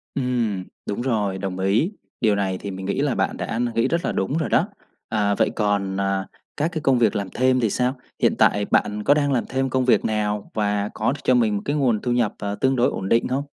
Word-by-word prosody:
Ừm, 120 -7 -1 0.2
đúng 105 - -3
rồi, 105 -6 0
đồng 95 -1 -4
ý. 100 - +2 0.3
Điều 110 -3 +3
này 95 -2 -1
thì 100 +1 -6
mình 95 0 -6
nghĩ 100 - -1
là 145 -3 +1
bạn - - -1
đã 110 - -3
n 120 - +1
nghĩ 115 - +2
rất 170 +1 -1
là - - 0
đúng 115 +11 -1
rồi 165 - -1
đó. 175 - +3 0.4
À, 105 -2 +1
vậy - - +2
còn, 100 -2 0
à, 95 -1 0 0.3
các 150 +3 +1
cái 160 -2 -3
công 135 -3 +3
việc 110 -4 +3
làm 100 -2 -2
thêm 130 0 +2
thì 115 -3 +1
sao? 125 +5 0 0.2
Hiện - - +3
tại 105 0 +3
bạn 105 0 +1
có 145 - +5
đang 145 -1 +1
làm 125 -4 +1
thêm 135 0 0
công 130 0 +1
việc 125 - +3
nào 105 -1 -1
và 105 -1 0
có 110 - 0
đ - - -3
cho 130 - +3
mình 110 -4 +2
một 100 - -2
cái 145 - 0
nguồn 125 -7 +1
thu 125 - -1
nhập, 120 -3 +1
à, 100 0 -3
tương 130 +6 +1
đối 125 0 +3
ổn 95 0 -4
định 115 - +3
hông? 130 +2 -1
110 Hz, 255 wpm, -23 LUFS, 100-130 Hz, 0.4 s, có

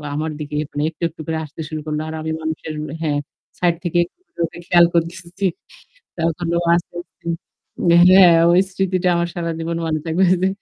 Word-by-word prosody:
আমার 155 +1 -2
দিকে 150 0 -5
এখন 145 -1 -7
একটু, 165 - -19
একটু 160 0 -11
করে 160 0 -1
আসতে 150 +1 -9
শুরু 155 - -4
করল। 150 0 -2
আর 160 - -5
আমি 160 0 -3
মানুষের 160 0 -4 0.3
হ্যাঁ, 150 -3 0 0.4
সাইড 175 -1 +2
থেকে 175 -1 -1
একটু 180 - -24
করে - - -23
ওকে 165 - -10
খেয়াল 175 -1 +6
করতেছি। 170 +3 -2 0.7
তখন 165 +1 -1
ও - - +2 0.2
আস্তে, 175 0 -4
আস্তে - - -36 0.6
উম-হ্যাঁ 175 +1 +7 0.2
ওই 175 - +5
স্মৃতিটা 185 -1 0
আমার 170 0 +1
সারাজীবন 165 -1 -3
মনে 155 -1 -1
থাকবে 165 +3 +1 0.2
যে 190 - +3
170 Hz, 180 wpm, -20 LUFS, 160-175 Hz, 0.7 s, উম-হ্যাঁ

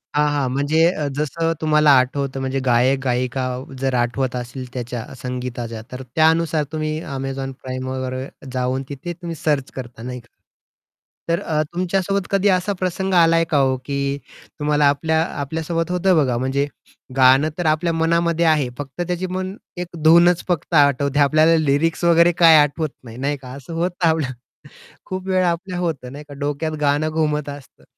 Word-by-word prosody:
हां, 150 0 +3
हां. 140 -3 0
म्हणजे 145 +5 +2
अ, 150 -5 -3
जसं 165 +3 -1
तुम्हाला 150 -1 +4
आठवतं 135 +1 -2
म्हणजे 135 0 -2
गायक-गायिका 130 +1 +1 0.4
जर 135 -1 0
आठवत 125 +1 0
असेल 125 +1 -5
त्याच्या, 120 -2 -4 0.2
संगीताच्या, 125 -3 -5
तर 130 +1 -6
त्यानुसार 160 -1 +3
तुम्ही 155 -1 -2 0.2
Amazon 135 0 -4
Primeवर 130 0 -4 0.4
जाऊन 130 +1 -1
तिथे 145 +5 -6
तुम्ही 170 -1 -7
सर्च 145 -4 0
करता 120 -3 -8
नाही 125 0 -5
का? 115 - -20 1.0
तर 170 +1 +1
अ, 155 -1 0
तुमच्यासोबत 185 +2 -1
कधी 195 +1 +2
असा 185 +2 +1
प्रसंग 190 +1 -2
आलाय 165 -1 +5
का 145 - +4
ओ, 130 -1 +2
की 140 0 -1 0.4
तुम्हाला 150 0 +2
आपल्या 160 +3 +1 0.2
आपल्यासोबत 165 +4 -2
होतं 180 0 +2
बघा 130 -6 +2
म्हणजे 135 +3 0 0.5
गाणं 135 +3 +5
तर 175 - -2
आपल्या 155 +2 +2
मनामध्ये 170 +1 +1
आहे 155 -5 +3
फक्त 140 +2 -6
त्याची 180 +1 -2
मन 185 +1 -4 0.3
एक 175 - -4 0.2
धूनच 170 +2 +6
फक्त 175 -1 -2
आठवते 140 -1 +3
आपल्याला 155 +3 +5
लिरिक्स 155 +2 +1
वगैरे 170 0 +5
काय 165 -2 +8
आठवत 150 +1 +2
नाही 115 -2 -11
नाही 140 +2 -1
का? 130 -2 -12
असं 140 +4 -9
होतं 175 +1 0
आपलं. 160 -4 +1 0.8
खूप 185 0 -5
वेळ 185 -1 +2
आपल्याला 180 +1 -2
होतं, 135 -6 -3
नाही 145 +2 -9
का, 145 - -9
डोक्यात 145 +2 -2
गाणं 145 +2 +2
घुमत 150 -2 -1
असतं. 140 -3 -11
150 Hz, 160 wpm, -21 LUFS, 130-165 Hz, 1.0 s, काय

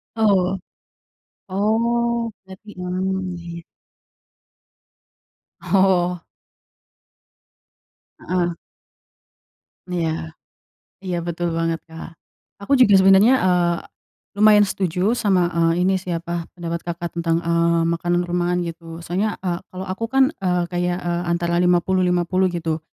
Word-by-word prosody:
Oh, 195 -4 +2 0.9
oh 230 +4 0
berarti 190 +3 -14
mmm, 185 0 -2
ya 170 0 -10
ya. - - -10 2.0
Oh. 180 -3 +2 2.0
Heeh. 175 -1 -1 1.4
Iya, 170 -2 -1 0.9
iya 180 -2 -2
betul 170 0 -2
banget, 165 0 -1
Kak, 165 0 -11 0.5
aku 240 - -7
juga 205 -6 +6
sebenernya, 195 +5 +6
eee, 175 -2 +2 0.6
lumayan 210 0 +6
setuju 190 +1 0
sama, 185 -7 +1
eee, 170 +1 +1
ini 190 0 +2
sih 180 -2 -4
apa, 170 0 -4
pendapat, 170 0 -5
Kakak, 170 0 -4
tentang, 165 0 0
eee, 170 0 +2
makanan 175 +1 0
rumahan 175 0 -1
gitu 165 0 -8
soalnya, 195 +6 -1
eee, 175 -1 -1
kalau 185 +1 -7
aku 190 +4 -4
kan, 270 +2 +3 0.2
eee, 180 -2 0
kayak, 175 0 -1
eee, 175 0 -1
antara 170 0 0
50-50 180 +1 +2
gitu, 165 -2 -2
180 Hz, 110 wpm, -21 LUFS, 170-190 Hz, 2.0 s, juga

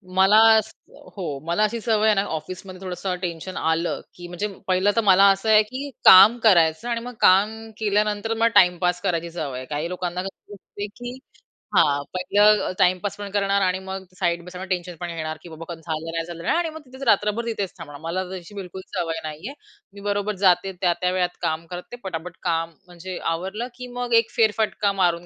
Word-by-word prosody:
मला 190 +3 +5 0.8
हो, 150 -8 -4
मला 175 +5 +1
अशी 220 +2 0
सवय 220 -1 +1
आहे 215 -1 +4
ना, 195 - +2
ऑफिसमध्ये 185 +3 -7
थोडसं 185 0 -3
टेन्शन 175 +1 -5
आलं 160 +1 0
की 175 0 -9
म्हणजे 175 +4 -3 0.2
पहिलं 185 +2 +3
तर 230 - +3
मला 195 -2 +6
असं 195 +3 -1
आहे, 215 0 +7
की 260 +6 -6 0.2
काम 205 +5 +9
करायचं 170 0 +4
आणि 235 -1 -1
मग 245 +1 -7
काम 215 +4 +3
केल्यानंतर 210 +1 0
मला 225 +1 +2
टाईमपास 180 -1 +4
करायची 170 -1 -1
सवय 150 -6 -4
आहे. 130 - -6
काही 150 +4 -3
लोकांना 180 0 -3
कसं 195 +1 -10
असते 205 +1 -8
की 245 0 -7 0.6
हां, 145 -1 +4
पहिलं 205 +3 +3
टाईम 180 0 +4
पास 205 - -3
पण 205 -1 -6
करणार 200 0 +1
आणि 185 -1 +1
मग 190 0 -5 0.2
साइड 170 -2 0
बाय 180 - -11
साइड 185 +1 -8
टेन्शन 180 -1 -3
पण 175 - -4
घेणार 155 -1 -4
की 175 - -11
बाबा 165 +2 -8
झालं 160 0 -5
नाही 165 0 -3
झालं 170 -1 -8
नाही - - +1
आणि 340 -1 0
मग 315 0 -9
तिथेच 260 +1 -14
रात्रभर 210 +2 +2
तिथेच 205 -5 -3
थांबणार. 145 -4 -9
मला 175 +3 -2
तशी 190 +2 -9
बिलकुल 190 -1 -7
सवय 165 -3 -2
नाहीये. 155 - -6 0.4
मी 200 - -11
बरोबर 205 +1 -1
जाते 185 +1 +4
त्या-त्या 180 0 +1
वेळात 180 -1 -1
काम 160 +1 -2
करते 180 +6 -7
पटापट 180 -2 -6
काम 165 -1 -1
म्हणजे 180 +1 -8 0.2
आवरलं 190 +8 -4
की 250 0 -8
मग 245 -1 -2
एक 230 - -16
फेरफटका 215 -2 +2
मारून 175 -1 +1
185 Hz, 195 wpm, -23 LUFS, 170-210 Hz, 0.8 s, काम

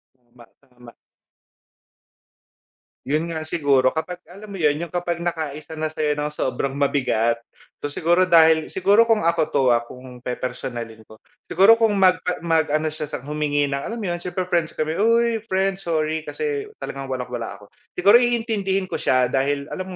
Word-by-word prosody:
Tama, 120 -1 -20 0.2
tama. 125 -3 -17 2.2
Yun 155 +4 0
nga 160 - -3
siguro 140 -4 +2
kapag 180 +2 -4
alam 200 +3 -11
mo 195 - -7
'yon 150 -2 +3
yung 170 - -12
kapag 175 -1 -2
nakaisa 155 -3 -4
na 155 0 -2
sa'yo 155 -1 -1
ng 150 - -1
sobrang 135 -2 -3
mabigat. 120 -5 +1 0.4
So, 145 - -3
siguro 175 +5 +2
dahil 160 -2 +5
siguro 205 +5 +3
kung 220 -5 +2
ako 170 0 +2
'to, 140 -3 +1
ah, 120 - +3
kung 125 -1 -12
pepersonalin 120 -2 -5
ko, 110 - -14 0.3
siguro 215 +6 +5
kung 220 -2 +3
mag 185 -1 +4 0.2
mag-ano 160 -2 +1
siya 155 -1 -5
sa 135 - -6
humingi 150 -1 0
ng 140 - -1
alam 225 +11 -5
mo 225 - -5
'yon 175 - -4
siyempre 180 +1 -3
friends 170 -3 -1
kami, 155 +3 -2
"Uy 230 +1 +3
friends 190 -1 -1
sorry 155 -1 0
kasi 435 -2 -3
talagang 135 0 -7
walang-wala 125 -4 -4
ako." 105 0 -18 0.2
Siguro, 200 +6 +6
iintindihin 220 -5 0
ko 185 - -5
siya 125 -1 +2
dahil 140 +1 0
alam 185 - -4
160 Hz, 165 wpm, -22 LUFS, 140-185 Hz, 2.2 s, Siguro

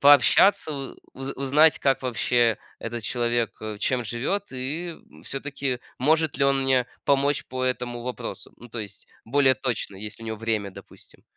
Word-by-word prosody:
Пообщаться, 145 - +6
у 135 -1 -6 0.2
уз 135 +1 -5
узнать, 150 +4 +4
как 135 -1 +2
вообще 120 -2 +2 0.2
этот 115 0 -5
человек, 120 0 0
э, 110 -1 -5
чем 125 +2 0
живет 135 - -2
и, 145 +7 -3 0.2
м, 75 +2 -16
всё-таки 135 -2 -3 0.2
может 155 +3 +2
ли 140 - +3
он 135 -1 +3
мне 130 -2 +3 0.2
помочь 140 +1 +2
по 130 0 -3
этому 125 -1 -2
вопросу. 120 -5 -6
Ну, 120 - -13
то 115 - -7
есть 105 -2 -8 0.2
более 130 +2 +4
точно, 115 -4 -3
есть 105 +2 -7
ли - - -8
у - - -7
него 110 - -3
время, 110 -3 -1
допустим. - - -13
125 Hz, 175 wpm, -25 LUFS, 115-140 Hz, 0.2 s, Пообщаться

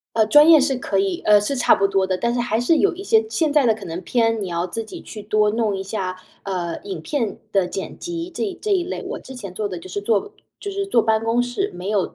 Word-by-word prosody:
呃， 220 -1 +4
专 295 +7 +7
业 315 -3 +8
是 270 -1 +1
可 200 -5 0
以， 195 -3 -2
呃， 210 -1 +6
是 265 +7 -2
差 245 - +5
不 195 - +1
多 195 -1 +1
的。 185 - 0
但 235 +5 -1
是 245 - -1
还 235 -1 0
是 320 +7 +3
有 395 - +2
一 370 - -8
些 440 +2 +3
现 320 -8 0
在 290 -3 +4
的 225 - +4
可 210 - -10
能 165 +1 -5
偏 225 -2 +1
你 - - -3
要 170 0 -2
自 220 +5 -4
己 220 - -10
去 215 - -9
多 210 0 +2
弄 215 -2 0
一 190 - -4
下， 190 -2 -4 0.3
呃， 180 -4 -3
影 395 -1 -6
片 245 -8 -2
的 195 -3 +2
剪 190 +2 -6
辑 345 0 -5
这 370 +2 -3
这 425 - -2
一 370 -3 +2
类。 365 - -5
我 - - -5
之 265 - -11
前 200 -7 -8
做 205 +2 -3
的 185 - -5
就 170 +2 -9
是 195 +3 -4
坐 210 - 0 0.3
就 405 - -5
是 395 0 -3
坐 235 - +3
办 220 0 +1
公 235 +2 +2
室， 245 +12 -2
没 180 +2 -6
有 205 -3 0
225 Hz, 295 characters per minute, -21 LUFS, 195-295 Hz, 0.3 s, 业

